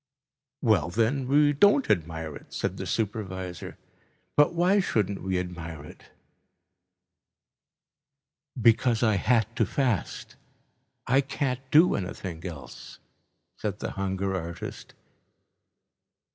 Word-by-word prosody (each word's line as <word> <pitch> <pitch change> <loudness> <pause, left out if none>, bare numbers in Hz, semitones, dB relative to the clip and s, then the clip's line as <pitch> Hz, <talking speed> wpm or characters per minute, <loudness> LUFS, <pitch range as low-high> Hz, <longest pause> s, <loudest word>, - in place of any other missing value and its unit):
"Well 105 - +3
then, 120 +7 0
we 145 +2 +4
don't 205 - +4
admire 80 -3 -2
it," - - -13
said - - -3
the - - -5
supervisor, 95 -5 -4 0.6
"but 145 +3 +4
why 180 +4 +4
shouldn't 105 - 0
we 95 -1 -1
admire 85 -4 -6
it?" - - -14 2.5
"Because 115 +1 +3
I 110 -3 +3
had 115 0 +1
to - - +2
fast. 125 - -2 0.7
I 135 +3 +4
can't 135 -2 -2
do 160 +6 +6
anything 90 -2 -5
else," 80 -6 -10 0.6
said - - -3
the - - -4
hunger 95 0 -2
artist. 85 -2 -6
105 Hz, 105 wpm, -27 LUFS, 90-135 Hz, 2.5 s, do